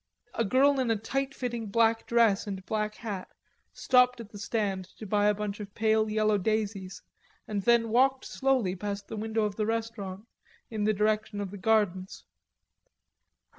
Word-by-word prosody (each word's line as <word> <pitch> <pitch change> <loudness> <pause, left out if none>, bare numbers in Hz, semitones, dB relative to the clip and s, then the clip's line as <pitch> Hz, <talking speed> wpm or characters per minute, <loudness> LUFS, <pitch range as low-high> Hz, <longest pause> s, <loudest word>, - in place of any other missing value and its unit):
A 230 - 0
girl 270 +5 +3
in 255 -2 0
a 225 - +3
tight 270 +6 -2
fitting 240 -3 -3
black 225 +2 +2
dress 230 -4 +3
and 190 -2 -5
black 215 0 -2
hat 205 -5 -5 0.4
stopped 250 -1 +3
at 225 -2 -9
the 205 - -10
stand 200 -4 -2
to 220 - -8
buy 205 +1 +2
a 210 - +4
bunch 205 0 -4
of 205 -1 -8
pale 220 0 +2
yellow 215 -1 +2
daisies, 200 -2 -2 0.4
and 205 -2 -2
then 235 +1 +3
walked 260 +3 +3
slowly 260 -9 0
past 200 +1 -5
the - - -5
window 220 +1 -1
of 210 -1 -2
the 215 - 0
restaurant 225 -3 -4 0.4
in 215 -2 -1
the 215 - +3
direction 215 0 0
of 200 -2 -4
the 205 - -7
gardens. 190 -3 0
215 Hz, 170 wpm, -29 LUFS, 205-230 Hz, 0.4 s, a